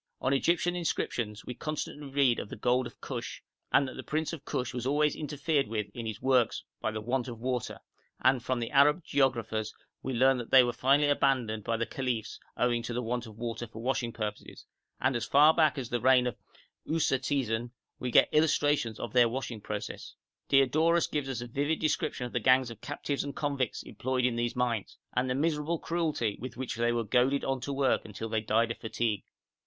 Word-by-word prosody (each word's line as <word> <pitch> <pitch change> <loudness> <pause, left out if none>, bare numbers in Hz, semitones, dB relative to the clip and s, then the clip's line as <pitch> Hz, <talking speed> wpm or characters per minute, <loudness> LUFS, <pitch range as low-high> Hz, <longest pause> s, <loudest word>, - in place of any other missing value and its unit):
On 130 - +1
Egyptian 175 +5 +2
inscriptions 120 -10 -2
we 125 - -5
constantly 150 0 -5
read 135 -3 +3
of - - -6
the - - -6
gold 125 +3 +1
of - - -16
Kush, - - -6 0.3
and 140 - +4
that 130 - -8
the - - -4
prince 155 +2 -2
of 155 -4 -7
Kush 125 -1 -2
was 125 0 -3
always 150 +1 +2
interfered 145 -1 -1
with 105 -2 -3
in 115 -2 -5
his 110 -1 -5
works 130 -3 +2 0.2
by - - -1
the 110 0 -4
want 125 +3 -1
of 120 -2 -6
water, 125 0 -2 0.4
and 130 0 +3
from 130 -1 -1
the 115 - -3
Arab 145 +4 +5
geographers 115 -7 0 0.3
we 130 -1 -3
learn 130 +1 +4
that 120 - -6
they 130 -1 +8
were 120 -1 -1
finally 140 +5 +3
abandoned 130 -7 +1
by 115 +2 -1
the 115 - -1
caliphs 120 -1 -3 0.2
owing 120 -1 +2
to 120 +1 -5
the 125 - 0
want 120 +1 -2
of 110 -1 -12
water 120 0 -4
for 110 0 -11
washing 125 -2 0
purposes, 105 -2 -6 0.3
and 130 -1 +1
as 115 -3 -2
far 150 +3 +6
back 155 -3 +3
as 125 -3 -4
the 120 -1 -1
reign 130 -1 +5
of 125 - -2 0.5
Usertesen 130 -6 0 0.3
we 125 - -2
get - - +6
illustrations 145 -6 +2
of 120 - -5
their 120 -2 +5
washing 120 -3 -4
process. 105 0 -6 0.3
Diodorus 155 +5 +4
gives 145 -3 -3
us 125 -3 -3
a 120 - -6
vivid 145 +6 0
description 150 -4 -1
of 120 - -7
the 125 - +1
gangs 130 0 +4
of 110 -2 -11
captives 145 -1 -3
and 140 0 -6
convicts 140 -5 -2
employed 130 0 -1
in 125 -2 +1
these 120 +1 -1
mines, 120 -4 -1 0.2
and 125 +1 +1
the 125 - 0
miserable 155 +2 0
cruelty 155 -12 -1
with 130 -2 -7
which 130 -1 -3
they 120 +1 +1
were 120 -1 0
goaded 125 +5 +2
on 135 -1 -1
to 140 - -4
work 135 -1 +1
until 110 +1 -6
they 110 -1 0
died 115 +2 +1
of - - -6
fatigue. 110 -2 -2
125 Hz, 210 wpm, -30 LUFS, 115-140 Hz, 0.5 s, they